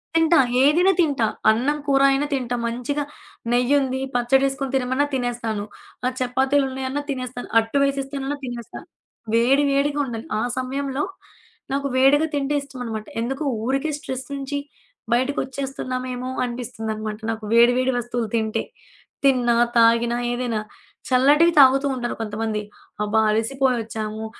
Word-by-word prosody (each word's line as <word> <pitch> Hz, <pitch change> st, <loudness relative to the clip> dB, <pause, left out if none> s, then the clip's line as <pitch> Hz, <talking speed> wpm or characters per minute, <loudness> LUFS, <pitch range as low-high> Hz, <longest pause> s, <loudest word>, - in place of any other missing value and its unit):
తింటా 325 Hz, 0 st, +4 dB, 0.3 s
ఏదైనా 340 Hz, +7 st, +5 dB
తింటా 285 Hz, -8 st, +2 dB, 0.3 s
అన్నం 260 Hz, +7 st, 0 dB
కూర 275 Hz, -1 st, +3 dB
అయినా 275 Hz, +2 st, +1 dB
తింటా. 245 Hz, -2 st, -1 dB
మంచిగా 250 Hz, +5 st, -2 dB, 0.5 s
నెయ్యుంది, 260 Hz, +2 st, +2 dB, 0.2 s
పచ్చడెసుకొని 270 Hz, +2 st, +1 dB
తినమన్నా 260 Hz, +2 st, +1 dB
తినేస్తాను. 240 Hz, -4 st, -2 dB, 0.4 s
ఆ -, -, +3 dB
చపాతీలు 265 Hz, +3 st, +2 dB
ఉన్నాయన్నా 265 Hz, +2 st, -3 dB
తినేస్తాను. 255 Hz, -2 st, -5 dB
అట్టు 225 Hz, +5 st, -2 dB
వేసేస్తానన్నా 275 Hz, 0 st, -2 dB
తినేస్తా. 240 Hz, -2 st, -7 dB, 0.5 s
వేడి 255 Hz, +5 st, +4 dB
వేడిగా 285 Hz, +1 st, +1 dB
ఉండాలి. 230 Hz, -3 st, -6 dB
ఆ -, -, 0 dB, 0.2 s
సమయంలో 270 Hz, +2 st, -2 dB, 0.7 s
నాకు 280 Hz, 0 st, -1 dB
వేడిగా 280 Hz, +4 st, +4 dB
తింటే 285 Hz, 0 st, 0 dB
ఇష్టంనమాట. 245 Hz, -6 st, -6 dB, 0.2 s
ఎందుకు 270 Hz, +5 st, -3 dB, 0.2 s
ఊరికే 270 Hz, +5 st, 0 dB
స్ట్రెస్ 260 Hz, -4 st, -6 dB
నుంచి 275 Hz, +1 st, -4 dB, 0.6 s
బయటకొచ్చేస్తున్నామేమో! 255 Hz, -1 st, -2 dB
అనిపిస్తుందనమాట. 220 Hz, -3 st, -4 dB
నాకు 220 Hz, -1 st, -6 dB
వేడి 235 Hz, +1 st, +6 dB
వేడి 255 Hz, +1 st, +2 dB
వస్తువులు 240 Hz, -1 st, -3 dB
తింటే 220 Hz, 0 st, 0 dB, 0.6 s
తిన్నా, 250 Hz, -3 st, +3 dB, 0.2 s
తాగినా 230 Hz, +1 st, +4 dB, 0.2 s
ఏదైనా 245 Hz, -3 st, -1 dB, 0.5 s
చల్లటివి 290 Hz, +7 st, +5 dB
తాగుతూ 270 Hz, +1 st, +6 dB
ఉంటారు 240 Hz, -1 st, -3 dB
కొంతమంది. 215 Hz, 0 st, -2 dB, 0.4 s
అబ్బా! 210 Hz, +1 st, +1 dB
అలసిపోయొచ్చాము, 225 Hz, -2 st, -1 dB
255 Hz, 120 wpm, -22 LUFS, 235-275 Hz, 0.7 s, వేడి